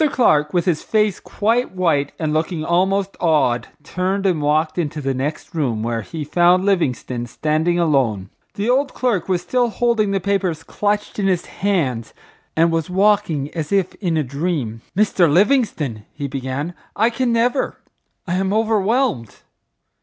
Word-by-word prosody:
Clark, 150 - +3
with 175 -2 +1
his 170 -4 +1
face 210 -2 +1
quite 230 +2 0
white 155 -6 +1
and 155 -2 -1
looking 155 0 -1
almost 190 +3 +1
awed, 135 -8 +2 0.2
turned 190 +4 -2
and 175 -5 +2
walked 155 +3 +1
into 155 -2 -2
the 135 -2 -1
next 145 +7 -4
room 125 -9 -1
where 115 0 -1
he 155 +8 -6
found 175 +5 +3
Livingstone 130 -10 0
standing 155 +7 0
alone. 130 - +1 0.2
The 205 +2 -2
old 270 +3 +1
clerk 220 -9 0
was 180 -2 0
still 245 +4 +1
holding 230 -2 +1
the 195 0 0
papers 185 -4 -1
clutched 210 +1 -2
in 195 - +1
his 180 -2 +1
hand 140 - -1 0.4
and 165 +1 +3
was 165 -1 -1
walking 190 -7 +1
as 160 -3 -4
if 195 -2 +1
in 170 -5 0
a 155 - +1
dream. 140 -5 -3 0.2
"Mr. 190 -6 +3
Livingstone," 175 - +2
he 145 -2 -4
began, 135 +5 -4 0.2
"I 225 +3 +2
can 250 0 0
never—I 235 -6 -2
am 190 0 0
overwhelmed! 220 - +1
175 Hz, 155 wpm, -20 LUFS, 145-200 Hz, 0.4 s, Clark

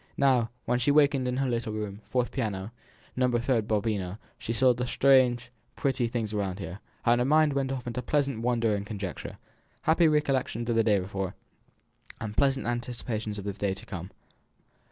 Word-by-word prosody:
Now, 130 -4 +3 0.2
when 120 +1 +1
she 125 - +2
wakened 140 -3 +4
in 125 0 -1
her 135 0 +1
little 115 -3 -1
room, 105 -1 -4
fourth 125 -1 0
piano, 105 -5 -3 0.4
No. 125 0 +3
36, 120 -2 +1
Babuino, 105 -3 -1 0.2
she 115 - -4
saw 125 +2 +4
the 125 +1 -3
strange, 125 -2 +4 0.2
pretty 130 -3 0
things 115 -2 -3
around 100 -3 -1
her, 100 -1 -6 0.3
and 120 0 +4
her - - +2
mind 155 +1 +4
went 135 -1 0
off 130 -3 -4
into 120 +1 -3
pleasant 140 -4 0
wonder 115 -3 +2
and 100 - -3
conjecture, 100 -3 -6 0.5
happy 165 +1 +4
recollections 135 -6 +1
of - - +1
the 115 - +4
day 105 -2 +4
before, 95 0 -3 0.8
and 105 -2 -5
pleasant 135 -1 +2
anticipations 120 -3 -3
of 100 - -6
the 100 - -2
day 100 -1 -1
to - - -9
come. 90 -2 -6
120 Hz, 180 wpm, -28 LUFS, 105-130 Hz, 0.8 s, wakened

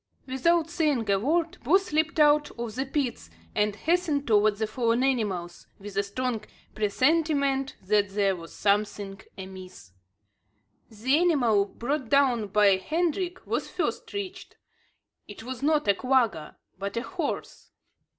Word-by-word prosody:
Without 315 +5 +2
saying 300 - 0
a 195 - +3
word, 320 - 0
both 380 +9 +2
leaped 315 +2 +1
out 295 0 +5
of 235 -2 -4
the 265 +3 -3
pits, 265 - -2 0.2
and 210 -1 +1
hastened 320 - 0
towards 210 -1 +3
the 220 - 0
fallen 230 +2 0
animals, 200 -10 -1
with 200 0 -10
a 200 - +3
strong 225 +2 -3 0.3
presentiment 275 +4 +1
that 205 +1 +2
there 195 -1 +1
was 165 -1 -10
something 200 -1 -1 0.2
amiss. 185 - -10 1.0
The 250 +7 +1
animal 245 - +3
brought 255 +4 -3
down 255 -6 +3
by 200 -1 +4
Hendrik 345 - -2
was - - -2
first - - -3
reached. 380 -2 -6 0.7
It 205 +1 -10
was 255 +1 -6
not 300 -1 +2
a 200 - +6
quagga, 230 - 0 0.2
but 200 +3 -4
a 235 - -1
horse! 345 -4 -5
245 Hz, 140 wpm, -27 LUFS, 205-300 Hz, 1.0 s, a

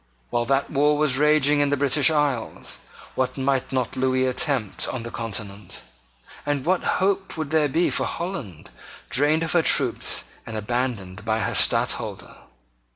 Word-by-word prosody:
While 120 0 0
that 135 +2 0
war 150 +1 +3
was 145 -3 +2
raging 150 -1 +4
in 145 -1 +2
the 145 - +1
British 140 +1 +4
Isles, 145 -7 -2 0.3
what 130 0 -1
might 135 -1 0
not 130 -3 -1
Lewis 130 0 +1
attempt 125 -5 0
on 125 -3 -4
the 115 - -7
Continent? 105 - -5 0.6
And 145 -2 -2
what 185 +1 +1
hope 190 -1 0
would 155 -2 -4
there 155 -2 +3
be 165 +6 +1
for - - 0
Holland, 170 - -6 0.4
drained 150 +4 +2
of 165 - -2
her 175 - +4
troops 135 -5 +1 0.2
and 115 -1 -6
abandoned 105 -4 -3
by 110 0 0
her - - -1
Stadtholder? - - +1
135 Hz, 155 wpm, -23 LUFS, 120-150 Hz, 0.6 s, raging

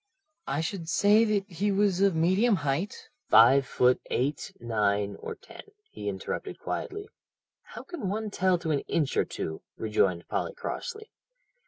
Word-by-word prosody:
"I 140 +3 -1
should 165 -1 -4
say 205 +5 +5
that 205 -2 0
he 200 +2 -1
was 195 -2 +2
of 195 -3 +4
medium 190 +8 +3
height 150 +4 -3
" - - -50
"Five 130 +5 +7
foot 125 0 +3
eight, 140 +4 -1
nine, 105 -3 0
or - - -6
ten?" - - -13 0.3
he - - -4
interrupted 475 0 -5
quietly. 410 +2 -5 0.5
"How - - -10
can 340 - -5
one 215 +1 -3
tell 185 -2 +2
to 165 -2 -3
an 145 - +2
inch 150 -5 0
or - - +3
two?" 80 0 -5 0.2
rejoined 95 -5 0
Polly - - -2
crossly. 435 -2 -6
170 Hz, 160 wpm, -28 LUFS, 130-205 Hz, 0.5 s, Five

